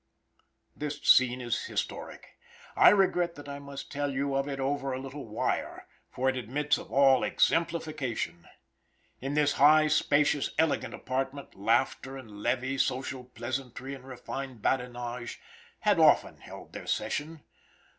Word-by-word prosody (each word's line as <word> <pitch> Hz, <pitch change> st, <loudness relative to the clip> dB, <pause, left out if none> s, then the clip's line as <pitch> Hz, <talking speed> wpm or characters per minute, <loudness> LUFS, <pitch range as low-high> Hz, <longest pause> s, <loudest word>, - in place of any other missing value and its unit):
This 150 Hz, 0 st, -4 dB
scene 125 Hz, 0 st, +5 dB
is 120 Hz, -1 st, -2 dB
historic. -, -, -5 dB, 0.4 s
I -, -, +8 dB
regret 180 Hz, -3 st, +2 dB
that 145 Hz, 0 st, -11 dB
I 140 Hz, 0 st, -6 dB
must 140 Hz, -1 st, -9 dB
tell 145 Hz, 0 st, -1 dB
you 140 Hz, +1 st, -1 dB
of 135 Hz, +1 st, 0 dB
it 140 Hz, -1 st, -4 dB
over 135 Hz, 0 st, -1 dB
a 130 Hz, -, -3 dB
little 135 Hz, 0 st, -7 dB
wire, 110 Hz, -, -2 dB, 0.2 s
for 130 Hz, -, -2 dB
it 130 Hz, -, +2 dB
admits 135 Hz, +5 st, 0 dB
of -, -, -11 dB
all 135 Hz, +1 st, +5 dB
exemplification. 145 Hz, -, 0 dB, 0.7 s
In 135 Hz, +3 st, -3 dB
this 150 Hz, -1 st, +3 dB
high, 155 Hz, +1 st, +7 dB
spacious, 145 Hz, -1 st, +2 dB
elegant 160 Hz, -2 st, +1 dB
apartment, 135 Hz, +2 st, -4 dB
laughter 120 Hz, +5 st, 0 dB
and 105 Hz, -6 st, -11 dB
levee, 130 Hz, +3 st, -1 dB
social 130 Hz, -1 st, -1 dB
pleasantry 125 Hz, +2 st, -5 dB
and 135 Hz, -2 st, -9 dB
refined 130 Hz, -1 st, -7 dB
badinage, 120 Hz, -1 st, -2 dB, 0.4 s
had 205 Hz, -4 st, +3 dB
often 155 Hz, -2 st, +4 dB
held -, -, -12 dB
their -, -, -8 dB
session. 155 Hz, +1 st, -2 dB
135 Hz, 140 wpm, -29 LUFS, 125-145 Hz, 0.7 s, I